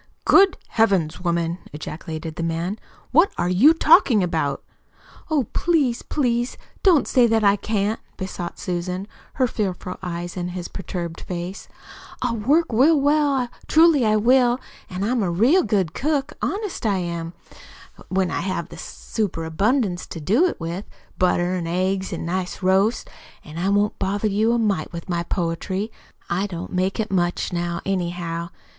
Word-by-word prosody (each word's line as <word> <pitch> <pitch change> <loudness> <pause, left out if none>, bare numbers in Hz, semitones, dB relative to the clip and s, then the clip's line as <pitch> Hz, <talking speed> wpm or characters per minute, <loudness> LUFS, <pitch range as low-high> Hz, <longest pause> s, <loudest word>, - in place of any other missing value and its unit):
"Good 390 -1 +6
Heavens, 190 -8 +1
woman!" 170 0 0
ejaculated 155 +1 -6
the - - -4
man. 165 +5 -2 0.3
"What 330 +8 +5
are 175 - 0
you 210 +12 +6
talking 310 - +5
about?" 160 -6 -1 0.7
"Oh, 305 -4 +2
please, 290 -9 +1
please 240 -3 -1 0.2
don't 350 -7 +4
say 245 -2 +4
that 225 -1 +2
I 200 0 +5
can't," 210 +1 -1 0.2
besought 185 -2 -5
Susan, 180 +2 -3 0.3
her 260 - +2
fearful 190 -6 -3
eyes 175 -1 -5
on 175 -1 -2
his 180 0 -5
perturbed 175 -3 -5
face. 180 +2 -6 0.5
"I'll 245 -2 -1
work 290 +10 +3
real 280 +7 +5
well 285 -3 +2 0.2
truly 320 -4 +5
I 215 -1 +3
will. 245 +3 +4 0.3
An' 185 +1 -4
I'm 240 +3 +1
a 190 - 0
real 235 - +4
good 190 - 0
cook, 295 0 -1
honest 410 -1 -3
I 205 -4 +2
am, 170 -2 -4 0.8
when 190 -1 +1
I - - -1
have 185 -2 -3
a - - -9
super 195 -7 -4
abundance 195 - 0
to 165 - -7
do 225 - +3
it - - -4
with 170 +4 -4 0.3
butter, 180 0 +2
an' 175 -2 -2
eggs, 190 +2 -1
an' - - -4
nice 180 +2 -3
roasts. 195 +5 +2 0.4
An' 155 +1 -8
I 190 +3 0
won't 205 +1 +1
bother 200 +2 0
you 215 +3 +2
a - - +2
mite 205 -8 0
with 170 -1 -7
my 170 -1 0
poetry. 185 +5 -2 0.4
I 185 +4 0
don't 175 -1 -7
make 185 +3 0
it 220 -2 -2
much 175 -1 0
now, 175 0 -2
anyhow. 175 -3 -2
190 Hz, 160 wpm, -22 LUFS, 175-235 Hz, 0.8 s, Good